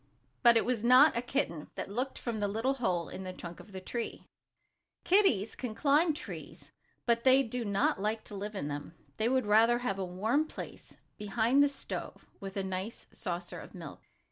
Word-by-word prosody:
But 235 -1 +7
it - - +2
was 240 -3 -1
not 255 +6 +7
a 235 - +1
kitten 240 - -2
that - - -5
looked 255 +5 -2
from 230 -3 -3
the 205 - +1
little 225 +6 0
hole 185 -10 -1
in - - -7
the 185 - -5
trunk 170 -1 -9
of 210 - -13
the 190 - -6
tree. 230 +5 -5 0.8
Kitties 350 - +3
can 240 -4 -5
climb 300 +5 +3
trees, - - -9 0.3
but 235 -1 +2
they 265 +1 +6
do 245 0 -3
not 200 -2 +1
like 215 +2 -1
to 205 - -8
live 205 +2 -5
in 170 -7 -3
them. 145 +3 -6 0.2
They 220 +2 +1
would 260 -2 +2
rather 225 +3 +5
have 220 -6 -2
a - - -1
warm 220 - 0
place - - -9 0.2
behind 225 +6 +2
the 285 - +5
stove, 280 - -6
with 195 -1 -7
a 195 - 0
nice 190 +4 -5
saucer 175 -4 -4
of - - -12
milk. - - -9
220 Hz, 195 wpm, -31 LUFS, 195-250 Hz, 0.8 s, But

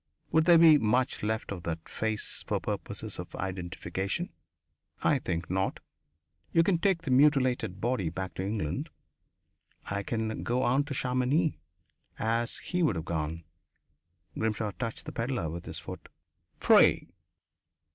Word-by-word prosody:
Would 160 0 +4
there 170 -1 +8
be 160 -2 +8
much 125 +3 +1
left 110 0 -2
of 95 -3 -4
that 85 -1 -4
face, 110 -1 -3
for - - 0
purposes - - -4
of - - -7
identification? 95 +1 -3 0.7
I - - +4
think 85 +1 -3
not. 95 +1 -1 0.7
You 165 - +5
can 175 -1 +2
take 180 -2 +2
the 135 - -2
mutilated 130 - +3
body 110 -6 0
back 95 +2 -5
to 95 - -4
England 100 -6 -2 1.0
and 100 - -2
I 100 - 0
can 110 +1 -2
go 125 +2 0
on 135 +4 +3
to 145 -2 -4
Chamonix, 130 +5 +1 0.6
as 115 +2 0
he 180 0 -2
would 155 - +3
have 80 -1 -4
gone." 80 0 -3 0.9
Grimshaw 110 -1 -1
touched 115 +2 -5
the - - -5
pedlar 115 - -2
with 85 +1 -7
his - - -6
foot. - - -8 0.5
"Free." - - +5
110 Hz, 145 wpm, -29 LUFS, 95-130 Hz, 1.0 s, there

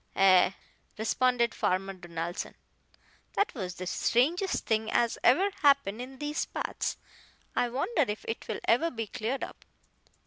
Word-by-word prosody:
"Ay," 190 0 +5 0.4
responded 235 +1 +2
Farmer 195 +1 0
Donaldson, 175 -1 -5 0.8
"that 405 - +1
was 185 -7 -5
the 185 - -6
strangest 320 - +1
thing 220 -1 +1
as 235 -1 +1
ever 375 +11 +5
happened 280 -7 +3
in 265 +1 -8
these 295 +2 -2
parts. - - -3 0.6
I 245 - +2
wonder 285 - +1
if 210 0 -4
it 225 - -4
will - - -4
ever 250 +9 +3
be 225 -6 -4
cleared 225 +6 -3
up." - - -8
235 Hz, 140 wpm, -29 LUFS, 195-275 Hz, 0.8 s, Ay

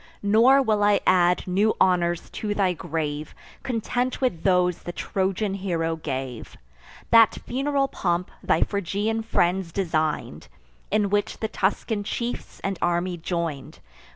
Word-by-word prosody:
Nor 235 +7 +5
will 215 -4 +1
I 205 -1 +4
add 180 -1 +3
new 200 +4 +2
honours 175 -2 +1
to 210 -1 -3
thy 190 -3 +2
grave, 155 -2 -4 0.3
Content 245 +1 -2
with 245 -11 0
those 180 -2 +2
the 175 - -6
Trojan 195 +2 -1
hero 170 -4 -1
gave: 135 -6 -5 0.5
That 230 -2 +6
funeral 275 +2 0
pomp 175 -6 -2
thy - - +2
Phrygian 205 +3 -2
friends 180 -5 0
design'd, 160 -5 -2 0.4
In 205 -2 +1
which 205 +1 0
the 220 - -2
Tuscan 205 +1 -1
chiefs 235 +3 -4
and 195 -2 -3
army 175 +1 0
join'd. 165 -5 -4
190 Hz, 130 wpm, -24 LUFS, 170-215 Hz, 0.5 s, That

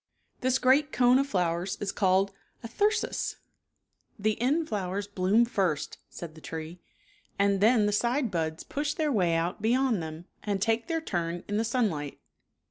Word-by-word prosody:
This 255 0 +2
great 275 +4 +3
cone 250 +1 +4
of 275 - +1
flowers 180 -3 -1
is 200 -1 -2
called 195 0 +2 0.3
a - - -4
thyrsus, 415 - 0 0.4
" - - -46
The 215 +1 +1
end 300 +6 +2
flowers 200 - -2
bloom 200 +3 +2
first," 185 -10 -1
said 170 -2 -8
the 160 - -14
tree, 160 +2 -7 0.3
" 410 0 -34
and 200 -1 +2
then 220 0 +5
the 210 - +2
side 240 +3 +1
buds 160 -2 -2
push 290 +1 -2
their 310 -2 0
way 180 -8 +2
out 170 +3 -1
beyond 240 -2 +2
them, 160 +1 -7 0.2
and 200 -2 -1
take 225 +2 +1
their 325 -1 -1
turn 175 - -3
in 205 - -1
the 220 - +1
sunlight. 210 - -1
205 Hz, 175 wpm, -28 LUFS, 175-250 Hz, 0.4 s, then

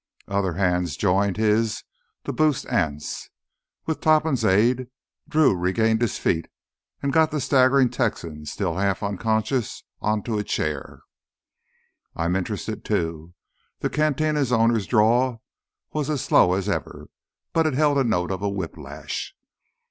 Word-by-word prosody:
Other 100 -3 0
hands 90 -3 0
joined 100 0 +1
his 110 0 +1 0.4
to - - -4
boost 155 -4 +1
Anse. 75 -1 -2 0.6
With 160 - -3
Topham's 155 -5 +3
aid 120 +6 +3 0.4
Drew 155 -9 +4
regained 110 +6 +1
his 120 - 0
feet 80 -1 0 0.6
and 140 -1 0
got 160 0 +4
the 150 - -2
staggering 130 0 +4
Texan, 85 -11 -3
still 95 -4 -2
half 100 0 0
unconscious, 110 +4 -1 0.2
onto 105 +1 -1
a - - -1
chair. 75 -7 -3 1.1
"I'm 85 +2 0
interested, 95 -1 -3
too." 80 +1 -2 0.5
The - - -1
cantina 150 0 +1
owner's 115 -3 +2
drawl 120 +2 +2 0.5
was 150 -1 -2
as 145 -4 -1
slow 90 - +4
as 95 +1 -1
ever, 80 -7 -4 0.4
but 165 -1 +3
it 150 - -1
held 145 -1 +3
a - - +3
note 95 -7 0
of 95 0 -3
a 100 - 0
whiplash. 95 -4 -6
110 Hz, 135 wpm, -24 LUFS, 95-130 Hz, 1.1 s, Drew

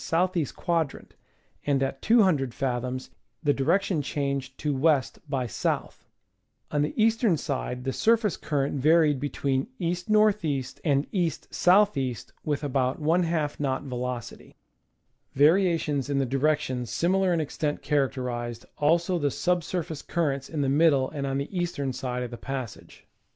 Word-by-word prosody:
E. 165 -4 +2
quadrant, 165 -5 -2 0.5
and 140 -2 +1
at 135 0 -3
200 185 - +3
fathoms 130 0 -3 0.3
the 145 -2 +3
direction 170 +4 +1
changed 140 -2 -3
to 150 -1 -1
W. 145 +2 +4 0.3
by 135 -3 0
S. 120 - -7 1.1
On 150 - +1
the 150 +9 -2
eastern 225 -4 +3
side 125 -3 -3
the 135 0 -2
surface 225 -4 +2
current 145 -2 -1
varied 155 -1 +4
be 145 +2 -2
tween 135 +2 -1
E. 175 -1 0
N. 215 -1 +5
E. 140 -4 0 0.2
and 140 -1 +2
E. 180 -4 +2
S. 165 - -7 0.3
E., 130 -3 -1 0.3
with 150 -1 -2
about 130 -2 0
^ 165 -1 +1
knot 135 -2 -1
velocity. 125 -3 -5 0.8
Varia 170 +5 +5
tions 145 -4 -2
in 140 - 0
the 135 - +2
direction 130 -2 0
similar 185 - +1
in 170 - +2
extent 150 0 -2
characterized 125 -5 -1
also 170 +4 +2
the 145 -2 +1
sub 180 +4 0
surface 160 -3 -4
currents 140 -6 -1
in 155 -3 -2
the 140 - +1
middle 140 -2 +3
and 140 -2 -3
on 135 0 -1
the 140 +7 -4
eastern 170 -7 -2
side 125 -1 -3
of 125 - -6
the 120 - -6
passage. 130 -4 -7
145 Hz, 155 wpm, -27 LUFS, 135-165 Hz, 1.1 s, N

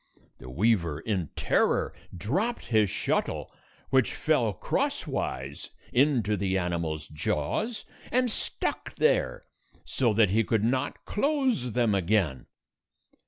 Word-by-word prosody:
The 65 - -10
weaver, 85 - +1
in 90 -2 -2
terror, - - +2 0.2
dropped 185 - -1
his 110 -3 +3
shuttle, - - -1 0.4
which - - +3
fell - - +2
crosswise 65 +3 -2 0.2
into 125 -6 +3
the 95 -1 0
animal's 85 -4 -2
jaws, 75 - -2 0.3
and 250 -1 +2
stuck - - -3
there - - +1 0.4
so 125 -4 +1
that 105 -4 +4
he 110 +3 +3
could 110 0 +1
not 130 +4 -1
close 255 - 0
them 120 -3 +2
again. 95 -7 +1
110 Hz, 115 wpm, -28 LUFS, 85-140 Hz, 0.4 s, that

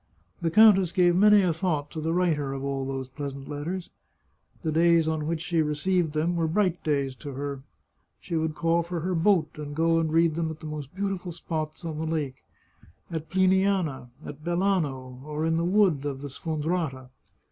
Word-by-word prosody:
The 170 - +1
countess 195 -2 +6
gave 175 -1 +3
many 210 +1 +6
a 175 -3 +2
thought 155 -4 -2
to 160 - -5
the 160 +1 -1
writer 160 -6 +1
of 135 0 -5
all 135 -1 -2
those 135 -1 -4
pleasant 140 0 -7
letters. 170 +5 -5 0.7
The 160 - 0
days 165 0 +4
on 155 -1 -1
which 165 -1 -2
she 170 -1 +1
received 155 +2 0
them 160 +3 0
were 165 -1 +1
bright 180 0 0
days 140 -3 0
to 145 -2 -7
her. 140 0 -4 0.6
She 170 - -5
would 160 -1 -1
call 165 +1 +2
for 170 0 -4
her 185 +3 -1
boat, 165 -3 +2
and 145 -1 -6
go 165 +1 +3
and 160 -1 0
read 165 0 +3
them 165 0 -1
at 160 -1 -7
the - - -11
most 150 -1 -6
beautiful 195 -2 -3
spots 160 -1 -5
on 155 -2 -4
the 160 - -2
lake 145 -5 -3 0.3
— 85 - -26
at 160 -1 -4
Pliniana, 185 -7 +2 0.2
at 145 +1 -9
Belano, 155 -9 -1
or 150 +1 -3
in 165 0 +1
the 165 - 0
wood 180 -6 +3
of 140 -2 -4
the 145 - -6
Sfon 155 +2 -4
drata. 150 -7 -2
160 Hz, 200 wpm, -27 LUFS, 145-175 Hz, 0.7 s, countess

